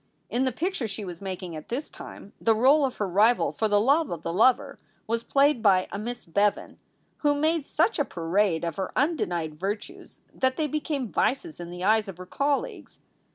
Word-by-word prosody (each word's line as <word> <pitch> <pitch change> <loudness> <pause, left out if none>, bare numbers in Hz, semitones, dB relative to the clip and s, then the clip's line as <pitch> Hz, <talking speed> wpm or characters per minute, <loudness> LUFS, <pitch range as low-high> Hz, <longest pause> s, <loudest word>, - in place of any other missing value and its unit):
In 255 +2 +1
the 260 - +1
picture 315 - -2
she 205 0 -6
was 175 -1 -8
making 185 -3 -5
at 155 - -9
this 270 +6 -3
time 200 - -11
the 225 -1 +3
role 275 +6 +5
of 260 - -4
her 205 - -1
rival 210 +6 +3
for 220 - -1
the 205 -1 +3
love 280 +8 +3
of 165 -2 -5
the 165 - -3
lover 230 +7 +3 0.3
was 230 +1 -1
played 280 0 +2
by 190 -4 +4
a 200 - -4
Miss 240 +3 -6
Bevan, 200 +4 0 0.4
who 290 -1 +2
made 310 0 0
such 445 - +1
a - - +4
parade 175 - 0
of 170 -2 -3
her 190 -1 -3
undenied 175 - -1
virtues 200 +3 -6
that 260 0 0
they 315 - +1
became 295 -4 -3
vices 290 +7 -1
in 170 -1 -7
the 180 +1 -7
eyes 215 +1 +3
of 190 -3 -8
her 185 - -9
colleagues. 290 - -2
220 Hz, 200 wpm, -26 LUFS, 185-280 Hz, 0.4 s, role